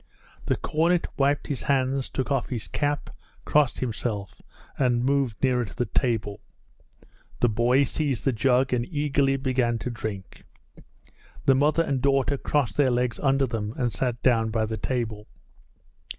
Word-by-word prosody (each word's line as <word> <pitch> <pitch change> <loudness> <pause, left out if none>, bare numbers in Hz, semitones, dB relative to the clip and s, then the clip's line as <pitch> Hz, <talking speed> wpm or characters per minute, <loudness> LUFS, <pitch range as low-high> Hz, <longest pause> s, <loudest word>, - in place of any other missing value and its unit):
The - - +2
cornet 170 +3 +1
wiped 140 +1 +1
his 145 - -3
hands, 135 -1 0
took 130 +2 -3
off 135 -3 0
his 115 -8 -4
cap, 145 - -2 0.3
crossed 145 -4 +2
himself, 110 -5 -4 0.3
and 125 -2 +1
moved 135 -5 0
nearer 125 -2 +3
to 105 - -9
the 125 - 0
table. 110 -6 -1 1.0
The 120 - +3
boy 120 +5 +3
seized 140 -2 -2
the 135 - +3
jug 125 +3 +2
and 120 +5 -1
eagerly 140 -2 +1
began 125 -3 0
to 125 - -4
drink. 105 -4 -7 1.0
The 135 - +6
mother 150 +5 +3
and 140 -5 -1
daughter 140 0 +2
crossed 130 -9 0
their 140 -3 +4
legs 120 -1 0
under 135 -1 +2
them 115 -3 -4
and 120 -3 0
sat 125 -3 -2
down 115 -3 +3
by 110 0 0
the 110 +1 -3
table. 110 -2 -3
125 Hz, 155 wpm, -25 LUFS, 115-140 Hz, 1.0 s, The